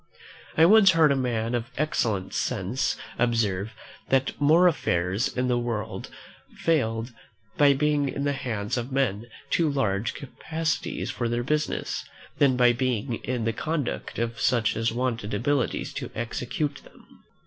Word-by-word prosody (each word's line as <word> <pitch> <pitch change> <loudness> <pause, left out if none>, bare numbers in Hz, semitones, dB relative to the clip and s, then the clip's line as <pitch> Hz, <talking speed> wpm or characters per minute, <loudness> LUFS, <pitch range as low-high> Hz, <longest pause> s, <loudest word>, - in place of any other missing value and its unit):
I 160 - +7
once 195 0 +7
heard 160 -3 +5
a - - +3
man 120 -3 -1
of 120 -1 -2
excellent 110 -10 -1
sense 125 +5 -1 0.2
observe, 110 -4 0 0.4
that 135 0 +2
more 160 +5 +5
affairs 90 - +1
in 125 0 -2
the 120 -1 +2
world 115 -3 -4 0.5
failed 115 -7 0 0.4
by 145 -1 +5
being 145 0 +1
in 140 - -3
the 145 0 +1
hands 115 -6 -3
of 120 +2 -4
men 120 -6 0
of - - -23 0.2
too 165 -3 +3
large 110 -6 0
capacities 160 +3 -3
for 120 -1 -2
their 120 +1 -1
business, 150 +3 -1 0.4
than 135 -3 +4
by 120 -1 +5
being 125 -1 -1
in 125 -3 -2
the 115 - 0
conduct 155 +2 -3
of 115 0 -2
such 120 -3 +2
as 115 0 0
wanted 115 -3 -2
abilities 135 +3 0
to - - -5
execute 140 +5 -3
them. - - -19
125 Hz, 150 wpm, -26 LUFS, 115-145 Hz, 0.5 s, I